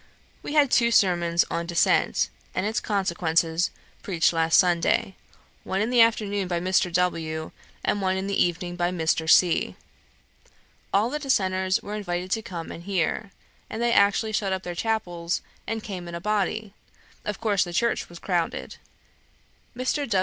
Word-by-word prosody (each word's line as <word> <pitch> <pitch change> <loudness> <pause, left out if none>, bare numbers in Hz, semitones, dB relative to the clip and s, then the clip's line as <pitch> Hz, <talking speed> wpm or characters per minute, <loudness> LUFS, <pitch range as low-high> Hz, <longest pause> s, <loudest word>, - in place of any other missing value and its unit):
We - - -6
had 290 -4 +4
two 235 -1 +4
sermons 175 -6 +3
on 170 0 -2
dissent, 170 -1 +2 0.2
and 185 - 0
its 220 +2 0
consequences, 170 -4 0 0.3
preached 175 -3 +1
last 165 0 +3
Sunday 175 +2 +2 0.5
one 190 - -2
in 220 +4 0
the 245 -2 +5
afternoon 205 -4 +2
by 175 -1 -1
Mr. 185 0 +1
W., 165 -3 -1 0.3
and 205 - +1
one 190 0 +1
in 190 - -2
the 200 0 +2
evening 175 0 -2
by 175 0 0
Mr. 160 -2 0
C. 175 0 +4 1.2
All 215 +5 +2
the 300 - -2
Dissenters 190 -6 +1
were 205 - -6
invited 185 -3 -3
to 225 - +1
come 170 -5 -7
and 170 - -9
hear, 195 +2 -1 0.4
and 220 - -5
they 235 0 +2
actually 205 +2 +3
shut 205 -2 -1
up 190 0 -2
their 175 - -4
chapels, 175 -4 -2 0.2
and 225 -1 -3
came 185 -4 -6
in 170 - -6
a - - -4
body; 210 +2 -1 0.5
of 210 -1 -4
course 205 -4 +2
the 175 - -7
church 235 +7 0
was 175 - -11
crowded. 170 -2 -2 1.0
Mr. 265 +2 -1
185 Hz, 165 wpm, -25 LUFS, 175-215 Hz, 1.2 s, the